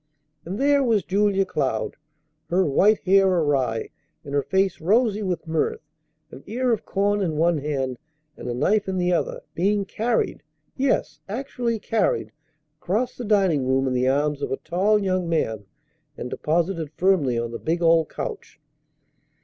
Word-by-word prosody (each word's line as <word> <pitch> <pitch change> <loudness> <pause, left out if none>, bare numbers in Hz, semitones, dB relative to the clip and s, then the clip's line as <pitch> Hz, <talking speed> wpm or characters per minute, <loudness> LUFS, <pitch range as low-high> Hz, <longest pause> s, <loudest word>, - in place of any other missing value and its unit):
And 185 +4 -4
there 280 +1 +3
was 225 -6 +2
Julia 195 +1 +2
Cloud, 130 - -2 0.5
her 185 +2 +2
white 200 +9 +3
hair 195 +1 +4
awry, 145 -10 0 0.3
and 140 - -8
her 145 - +2
face 190 +5 0
rosy 215 +4 +2
with 180 -4 -2
mirth, 160 - -1 0.5
an 135 - -10
ear 245 +4 0
of 220 - -3
corn 205 +1 +1
in 160 -5 -1
one 165 0 +2
hand 135 -4 -2 0.4
and - - -7
a - - -1
knife 205 - +1
in 190 -1 -2
the 180 0 +1
other, 170 - -1
being 200 +3 +1
carried 225 +4 -1 0.3
yes, 270 0 0
actually 235 0 -2
carried 220 +1 0 0.5
across 220 +8 -1
the 245 - -6
dining 190 - +2
room 135 +1 +2
in 130 - 0
the 125 0 +1
arms 145 +2 +1
of - - -3
a 135 - 0
tall 190 +6 +1
young 185 -3 -1
man 110 -10 -1 0.5
and 125 - -6
deposited 165 -1 -1
firmly 170 -10 +2
on 115 0 -2
the 115 - -6
big 170 +2 -1
old 165 -1 +4
couch. 445 -4 -6
180 Hz, 165 wpm, -24 LUFS, 145-205 Hz, 0.5 s, hair